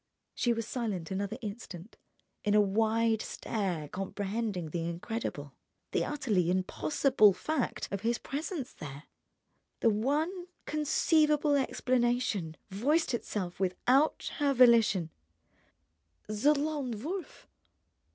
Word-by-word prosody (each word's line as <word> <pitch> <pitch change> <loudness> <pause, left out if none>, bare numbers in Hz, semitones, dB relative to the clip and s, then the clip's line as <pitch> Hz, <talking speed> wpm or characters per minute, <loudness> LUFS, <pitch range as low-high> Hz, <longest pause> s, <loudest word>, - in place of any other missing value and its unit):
She 240 - +1
was 230 -1 -2
silent 205 -9 -3
another 200 +3 -2
instant, 205 -2 -7 0.5
in 205 0 +2
a - - +7
wide 220 +2 +2
stare 180 -8 -3
comprehending 195 0 -3
the 170 0 -2
incredible, 170 - -5 0.4
the - - +1
utterly 220 - 0
impossible 210 +4 +3
fact 245 - -2
of 200 -1 -3
his 235 +2 +1
presence 295 -1 -4
there. 145 0 -8 0.8
The 230 - +5
one 305 - -1 0.2
conceivable 300 0 +2
explanation 240 - 0
voiced 280 - +1
itself 190 -6 -3
without 250 +10 +2
her 285 -2 +2
volition: 225 -9 +5 1.2
"The 230 +8 +3
Lone 285 -7 -2
Wolf!" 360 +3 -6
225 Hz, 105 wpm, -31 LUFS, 195-275 Hz, 1.2 s, a